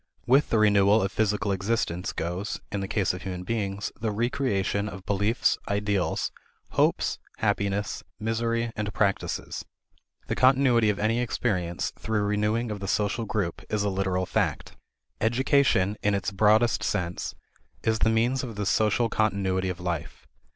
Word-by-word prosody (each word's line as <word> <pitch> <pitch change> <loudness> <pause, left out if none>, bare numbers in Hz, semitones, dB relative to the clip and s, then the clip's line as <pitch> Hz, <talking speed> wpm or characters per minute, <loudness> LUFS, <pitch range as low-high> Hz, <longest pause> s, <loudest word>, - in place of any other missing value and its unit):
With 135 +4 +4
the 115 - +2
renewal 105 0 +5
of 100 - -1
physical 105 -1 0
existence 95 -3 -1
goes, 90 +5 -3
in 100 - -2
the 95 - -3
case 100 -3 +1
of 90 - -6
human 90 -1 -5
beings, 100 -1 -2
the 115 - 0
recreation 105 -3 0
of 95 -1 -9
beliefs, 105 +4 +1
ideals, 100 -4 0 0.4
hopes, - - +1 0.2
happiness, 100 0 -1 0.2
misery, 115 +1 -1
and 105 0 -2
practices. 100 -2 -1 0.6
The - - -2
continuity 130 -4 +4
of 105 - 0
any 110 +3 +1
experience, 90 -8 -1
through 110 -1 0
renewing 105 +3 0
of 105 - -4
the 100 - -5
social 105 +3 0
group, 100 -5 -2
is 105 -1 0
a 100 - +1
literal 95 -1 0
fact. - - -1 0.4
Education, 120 -4 +2
in 105 0 +2
its 100 0 -2
broadest 110 +4 +3
sense, 90 -4 -2 0.5
is 110 -1 +1
the 110 - +3
means 120 +4 +2
of 115 -4 -6
this 105 -1 -1
social 110 +2 +2
continuity 95 -4 0
of 90 0 -4
life. 85 -3 -4
105 Hz, 150 wpm, -27 LUFS, 95-115 Hz, 0.6 s, renewal